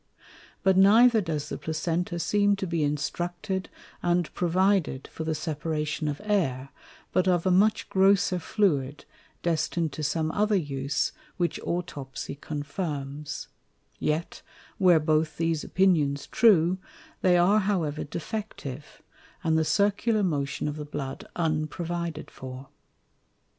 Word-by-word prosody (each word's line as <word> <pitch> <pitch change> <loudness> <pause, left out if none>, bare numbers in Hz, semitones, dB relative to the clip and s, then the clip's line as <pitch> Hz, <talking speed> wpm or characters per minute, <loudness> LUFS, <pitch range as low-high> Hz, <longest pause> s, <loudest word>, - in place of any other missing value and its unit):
But 190 -1 +4
neither 220 +4 +6
does 155 -5 -3
the - - -5
Placenta 170 +2 -2
seem 205 +3 +2
to 195 - -3
be 170 -2 -1
instructed 175 +5 -2 0.3
and 175 -1 +1
provided 180 -5 +1
for 160 - -6
the 160 0 -1
separation 155 0 -2
of 145 -1 -2
Air, 140 -11 0 0.4
but 185 - +2
of 175 -1 +2
a 185 - +3
much 205 +4 +3
grosser 190 -1 +3
Fluid, 150 -8 0 0.4
destin'd 165 -1 0
to - - -5
some 155 +2 0
other 210 +2 +2
use, 140 -5 -1 0.3
which 175 -2 0
Autopsie 145 -7 -4
confirms: 145 -1 -4 0.5
Yet, 155 +2 -2 0.4
were 180 -4 +6
both 155 0 +1
these 165 -2 0
Opinions 155 -7 +2
true, 185 -5 +4 0.4
they 180 -1 +5
are 190 +5 +5
however 175 -7 -1
defective, 150 - -6 0.4
and 160 -1 +2
the 160 - +3
Circular 205 +5 +2
Motion 145 -5 -1
of 150 0 -3
the 150 - -4
Blood 145 -2 -6
unprovided 165 0 -2
for. 130 +1 -9
165 Hz, 125 wpm, -27 LUFS, 150-190 Hz, 0.5 s, neither